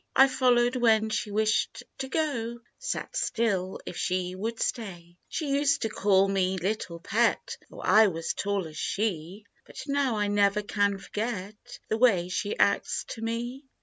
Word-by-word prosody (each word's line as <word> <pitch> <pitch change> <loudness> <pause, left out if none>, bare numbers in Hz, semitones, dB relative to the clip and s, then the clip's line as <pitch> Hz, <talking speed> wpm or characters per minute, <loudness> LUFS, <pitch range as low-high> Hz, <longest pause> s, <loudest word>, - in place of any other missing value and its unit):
I 270 - +8
followed 250 -1 +3
when 220 -2 +3
she 215 - -1
wished 215 +1 0 0.2
to 265 - -3
go; 240 -7 -1 0.2
Sat - - -4
still 195 -5 0
if - - -6
she 180 0 -1
would 225 +5 -4
stay, 175 -7 -4
" - - -42
She 305 -4 -2
used 280 -1 +2
to 225 - 0
call 195 -2 +3
me 190 -1 +1
4 180 +1 -1
Little 180 -6 -4
Pet/ 225 +7 0
Though - - -10
I 220 0 +6
was 165 -3 -2
tall 200 -3 -1
as 155 0 -9
she; 195 -1 -2 0.2
But - - -8
now 275 -5 0
I 205 0 +1
never 205 0 +2
can 200 -1 +1
forget 205 0 -5
The 220 - -1
way 195 -8 +4
she 205 +3 -2
acts 200 - +1
to 225 - -6
me! 240 +4 -4
215 Hz, 175 wpm, -28 LUFS, 195-240 Hz, 0.2 s, I